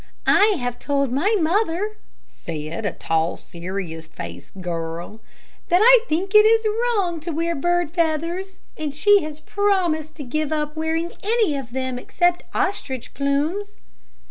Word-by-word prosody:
"I 415 0 +5
have 245 -1 -3
told 280 -3 0
my 385 - +2
mother," 395 +4 0 0.3
said 165 +5 -5
a - - -1
tall, 165 +1 -1
serious 170 -2 -6
faced 90 - -9
girl, 170 +3 -5 0.5
"that 355 +2 +4
I - - +9
think 370 +6 -1
it 425 - +10
is 450 +1 +4
wrong 425 -6 0
to 320 +3 -6
wear 335 +1 0
bird 350 +1 0
feathers, 340 +3 -1
and 300 -2 -4
she 410 +6 +5
has 305 0 -6
promised 345 -5 0
to 295 - -7
give 305 +4 -2
up 300 -1 -1
wearing 320 +2 -1
any 430 -7 +2
of 265 -4 -6
them 260 0 -3
except 350 +6 +1
ostrich 265 - -2
plumes." 305 +9 -1
315 Hz, 145 wpm, -22 LUFS, 250-380 Hz, 0.5 s, it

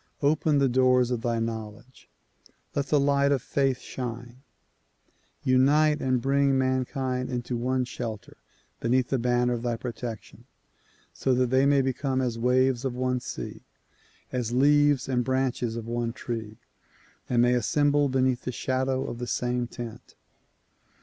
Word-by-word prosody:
Open 150 +1 +2
the 140 -1 +3
doors 125 -1 +3
of 120 -2 -1
thy 120 -1 0
knowledge; 115 - -6 0.6
let 140 -1 -1
the 150 - +3
light 140 0 +3
of 140 - +2
faith 135 -2 0
shine. 120 0 -7 1.0
Unite 150 +4 +3
and 130 -1 +1
bring 135 +1 +2
mankind 130 0 -1
into 125 -1 -3
one 125 +2 0
shelter 115 -4 -7 0.4
beneath 125 +2 +1
the 135 - 0
banner 125 0 +1
of 120 - -3
thy 120 -1 -1
protection 120 -2 -7 0.7
so 130 -1 0
that 125 -1 +1
they 130 +1 +4
may 140 -1 +4
become 130 0 -1
as 120 -3 -1
waves 125 +1 +2
of 130 -2 -2
one 125 0 0
sea, 120 - -7 0.7
as 125 -3 -2
leaves 145 +1 +3
and 125 -2 0
branches 130 -2 -1
of 115 -1 -5
one 120 0 -2
tree, 110 -3 -6 0.7
and 120 -1 +3
may 125 0 +4
assemble 145 +4 +2
beneath 130 -1 +1
the 125 - -4
shadow 130 +1 -1
of 120 - -6
the 125 - -4
same 125 0 -1
tent. 115 -1 -9
125 Hz, 150 wpm, -26 LUFS, 120-135 Hz, 1.0 s, they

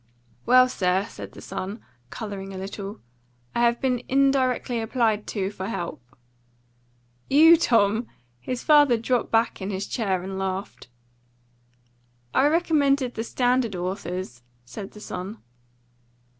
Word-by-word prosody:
"Well, 255 0 +7
sir," 190 -4 0
said - - -10
the - - -12
son, 200 +5 -5 0.3
colouring 195 - -6
a - - -6
little, 200 +1 -7 0.5
"I - - -1
have 235 0 +3
been 250 -3 0
indirectly 260 -3 +2
applied 225 -2 0
to 195 -2 -2
for 190 -2 -6
help." 170 - -4 1.3
"You, 320 +4 +8
Tom!" 225 -6 +2 0.3
His 250 - -4
father 290 -5 +5
dropped 240 +1 0
back 225 -2 +1
in 190 - -3
his 195 0 -3
chair 195 -7 -1
and 190 0 -5
laughed. 190 -5 -4 1.5
"I 275 - +4
recommended 285 -5 +2
the 225 - -3
standard 245 -3 +1
authors," 180 -7 -4 0.2
said 195 - -8
the 210 - -11
son. 195 +2 -6
225 Hz, 130 wpm, -25 LUFS, 195-255 Hz, 1.5 s, You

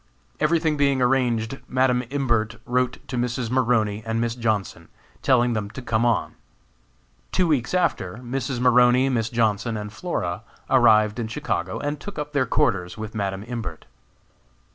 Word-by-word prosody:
Everything 155 -1 +2
being 140 -2 +2
arranged, 125 -1 +1
Madam 130 -1 +2
Imbert 120 -5 0
wrote 125 0 0
to 125 - -4
Mrs. 120 -1 -2
Maroney 115 -5 +1
and 115 +1 -2
Miss 115 0 0
Johnson, 110 -5 -2 0.3
telling 125 -2 +3
them 105 -2 -2
to 130 - -8
come 115 0 +1
on. 120 - 0 1.0
Two 185 - +2
weeks 150 0 0
after, 170 - 0
Mrs. 125 +1 -3
Maroney, 125 +1 +5
Miss 115 -4 0
Johnson, 115 -1 0
and 105 0 -6
Flora 90 - -3 0.3
arrived 105 +1 +5
in 115 - -2
Chicago, 95 -4 -3
and 145 0 -3
took 205 +5 -8
up 150 0 -5
their 135 -3 +1
quarters 105 -12 0
with 110 0 -6
Madam 100 -2 -3
Imbert. 115 0 -6
120 Hz, 150 wpm, -24 LUFS, 110-130 Hz, 1.0 s, Maroney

